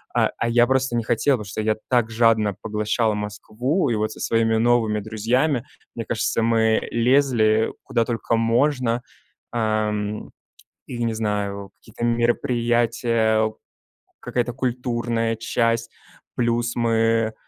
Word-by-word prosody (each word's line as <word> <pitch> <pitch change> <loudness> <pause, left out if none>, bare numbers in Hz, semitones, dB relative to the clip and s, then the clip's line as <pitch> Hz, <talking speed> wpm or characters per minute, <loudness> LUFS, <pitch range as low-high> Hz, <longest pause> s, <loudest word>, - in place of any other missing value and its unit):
А 120 - +1
я 120 +1 +4
просто 130 -1 +1
не 115 - 0
хотел, 120 +4 +2
потому 105 - -7
что 100 - -6
я 110 0 +1
так 120 -3 +2
жадно 110 -2 +3
поглощал 105 +1 0
Москву, 110 - -2
и 115 - +1
вот 110 0 -1
со - - -10
своими 115 -1 +1
новыми 115 -2 +2
друзьями, 120 +6 0 0.3
мне 115 - -4
кажется, 110 +1 0
мы 110 -1 +2
лезли, 115 -3 +3
куда 115 - 0
только 115 0 -1
можно. 120 +1 +1 0.5
Эм, 105 -2 -1 0.6
и, 120 -1 -5
не 115 -1 0
знаю, 100 -2 -3
какие-то 115 +1 -7
мероприятия, 120 -2 +1 0.7
какая-то 120 -1 -2
культурная 120 -2 -1
часть, 115 0 0 0.4
плюс 120 0 0
мы, 115 -1 +1
115 Hz, 125 wpm, -22 LUFS, 110-120 Hz, 0.7 s, я